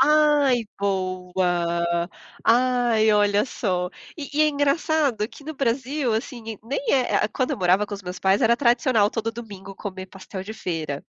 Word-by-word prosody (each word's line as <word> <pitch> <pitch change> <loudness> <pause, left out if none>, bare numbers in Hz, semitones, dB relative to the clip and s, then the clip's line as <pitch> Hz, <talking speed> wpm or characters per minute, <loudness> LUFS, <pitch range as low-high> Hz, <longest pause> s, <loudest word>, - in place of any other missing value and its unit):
Ai, 290 -4 +4 0.2
boa. 180 -3 0 0.4
Ai, 240 -2 +3
olha 205 +1 +3
só. 180 -8 -2 0.3
E 290 -3 -6
e 305 - +4
é 305 - +4
engraçado 285 -5 +1
que 285 - -14
no 315 0 -6
Brasil, 265 0 -1
assim, 235 +1 -4 0.2
nem 275 +4 -2
é 260 -3 +2
ah - - +3
ah, - - 0
quando 255 +4 -1
eu - - -3
morava 185 +3 +3
com 205 - -5
os 200 - -9
meus 180 0 -6
pais, 190 +3 +2
era 235 +1 +4
tradicional 235 -4 +3
todo 225 0 -2
domingo 200 -4 -9
comer 190 -2 -7
pastel 190 0 -8
de 210 - -7
feira. 160 -8 -4
220 Hz, 170 wpm, -24 LUFS, 190-260 Hz, 0.4 s, Ai